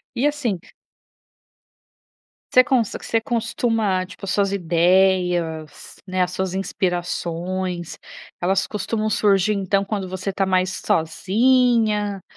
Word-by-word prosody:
E 255 +4 +1
assim 285 -10 -1 1.9
você 255 - +7
conse 245 -6 +1
você 225 - -1
costuma, 225 -5 0
tipo 190 +2 -12
as 195 - -3
suas 200 -1 +1
ideias, 175 -3 +1
né, 185 -1 0
as 180 0 -1
suas 190 0 -2
inspirações, 180 -1 -3 0.4
elas 190 +2 +1
costumam 215 +1 -2
surgir 200 -1 +3
então 195 0 0
quando 195 -2 -3
você 185 +2 -4
tá 195 0 0
mais 185 0 +1
sozinha, 210 +3 +2
195 Hz, 110 wpm, -22 LUFS, 180-215 Hz, 1.9 s, você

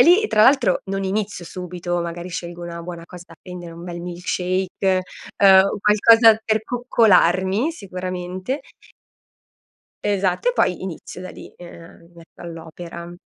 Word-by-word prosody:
E - - +10
lì 375 - +5
tra 215 - +3
l'altro, 255 -7 +4
non 195 0 -3
inizio 195 -2 -3
subito, 175 0 -4
magari 170 +1 -6
scelgo 175 -1 -6
una 170 0 -7
buona 170 -1 -8
cosa 180 -1 -11
da 165 - -13
prendere, 180 -2 -9
un 170 +1 -10
bel 175 -1 -6
milk 175 +1 -8
shake, 185 +1 0 0.3
ehm, 190 -1 +7 0.2
qualcosa 225 +2 +6
per 220 0 +1
coccolarmi 220 - +2
sicuramente. 185 - -5 1.4
Esatto 200 - 0
e - - +2
poi 185 - 0
inizio 180 0 -7
da 185 - -7
lì, - - -12
ehm, 170 -1 -13
mi - - -26
metto 170 -1 -18
all'opera. 170 +1 -9
185 Hz, 150 wpm, -21 LUFS, 175-205 Hz, 1.4 s, E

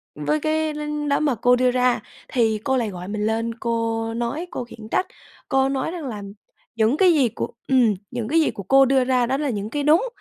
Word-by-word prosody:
với 150 +1 0
cái 310 0 0
đánh 300 -1 -3
đó 280 - +2
mà 290 -5 +1
cô 245 +3 +3
đưa 250 0 +2
ra, 250 -1 +2 0.3
thì 220 -4 +1
cô 265 -1 +1
lại 230 -4 -1
gọi 180 -1 -7
mình 210 0 -2
lên 225 +1 -1
cô 230 -1 -2
nói, 240 +9 -3
cô - - -4
khiển 225 -2 -12
trách. 370 - +1 0.4
Cô 270 -1 +2
nói 275 +4 -2
rằng 340 -5 -6
là 210 -4 -6 0.5
"Những 230 +6 +2
cái 365 -3 +5
gì 265 -6 +3
của" - - -5 0.2
ừm, 250 -5 +4 0.2
"Những 240 -3 -3
cái 325 +3 +3
gì - - +1
của 200 - -8
cô 270 +6 +5
đưa 265 0 +3
ra 250 -1 +2
đó 265 +3 0
là 295 -2 -1
những 210 -2 -3
cái 290 +2 -2
đúng, 330 - +4
250 Hz, 235 wpm, -22 LUFS, 225-290 Hz, 0.5 s, cái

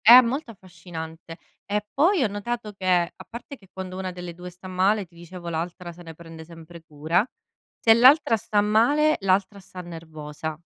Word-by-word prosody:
È 240 +3 +12
molto 255 +2 -3
affascinante. 170 -4 -9 0.3
E 210 0 -1
poi 335 +2 +3
ho - - +3
notato 210 +2 -4
che, 195 -1 -8
a 175 -2 +1
parte 240 +4 -8
che 195 -8 -22
quando 185 -1 -7
una 190 -1 -3
delle 180 -1 -7
2 180 +1 -9
sta 180 +1 -12
male 190 +3 +1
ti 170 - -30
dicevo 175 +1 -10
l'altra 170 +2 -4
se 175 +1 -14
ne 165 -1 -10
prende 165 0 -11
sempre 165 +1 -13
cura, 160 +5 0 0.5
se 225 - +6
l'altra 255 +2 +6
sta 210 -1 0
male 245 +9 +3
l'altra 195 +1 +1
sta 185 -1 -12
nervosa. 160 -2 -7
185 Hz, 180 wpm, -25 LUFS, 170-215 Hz, 0.5 s, È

